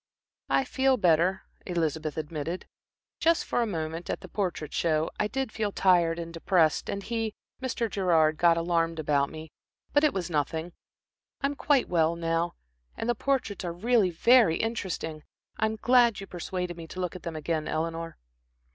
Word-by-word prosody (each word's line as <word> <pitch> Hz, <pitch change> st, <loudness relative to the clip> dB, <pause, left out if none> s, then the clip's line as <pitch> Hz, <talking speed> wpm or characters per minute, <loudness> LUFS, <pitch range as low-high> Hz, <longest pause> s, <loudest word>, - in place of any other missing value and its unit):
"I -, -, +3 dB
feel 265 Hz, 0 st, +2 dB
better," 180 Hz, 0 st, +3 dB, 0.2 s
Elizabeth 160 Hz, -4 st, -1 dB
admitted. 155 Hz, +3 st, -4 dB, 0.5 s
"Just 335 Hz, 0 st, +3 dB
for -, -, 0 dB
a 235 Hz, -, +1 dB
moment, 165 Hz, -2 st, -4 dB
at -, -, -2 dB
the -, -, -9 dB
Portrait 175 Hz, -6 st, -3 dB
Show, 160 Hz, -1 st, +1 dB
I 210 Hz, -, +2 dB
did 265 Hz, +2 st, -3 dB
feel 215 Hz, -2 st, -2 dB
tired 175 Hz, -4 st, +3 dB
and 170 Hz, -1 st, -6 dB
depressed, 165 Hz, -2 st, +2 dB
and 200 Hz, 0 st, -3 dB
he 225 Hz, -1 st, -2 dB, 0.3 s
Mr. 255 Hz, -2 st, -1 dB
Gerard 165 Hz, -7 st, +2 dB
got 170 Hz, 0 st, +4 dB
alarmed 165 Hz, -1 st, 0 dB
about 145 Hz, -2 st, +1 dB
me, 155 Hz, -1 st, -9 dB, 0.4 s
but 290 Hz, -, +4 dB
it 305 Hz, -, +5 dB
was 185 Hz, -6 st, -3 dB
nothing. 160 Hz, +1 st, -2 dB, 0.7 s
I -, -, 0 dB
am 280 Hz, -, +1 dB
quite 285 Hz, -2 st, +2 dB
well 165 Hz, -1 st, +2 dB
now. 165 Hz, 0 st, -1 dB, 0.4 s
And -, -, -3 dB
the 240 Hz, -, +3 dB
portraits 245 Hz, -5 st, -1 dB
are 175 Hz, -, -2 dB
really 215 Hz, +2 st, +2 dB
very 210 Hz, 0 st, +5 dB
interesting. 185 Hz, -8 st, -3 dB, 0.4 s
I 220 Hz, -, +2 dB
am 220 Hz, -, -3 dB
glad 240 Hz, -1 st, +4 dB
you 195 Hz, -, -6 dB
persuaded 180 Hz, -1 st, -4 dB
me 165 Hz, -1 st, -8 dB
to 185 Hz, -, -8 dB
look 180 Hz, -1 st, -2 dB
at 185 Hz, -, -7 dB
them 165 Hz, -1 st, -5 dB
again, 155 Hz, 0 st, -2 dB
Eleanor." 165 Hz, +1 st, -3 dB
175 Hz, 175 wpm, -28 LUFS, 165-220 Hz, 0.7 s, it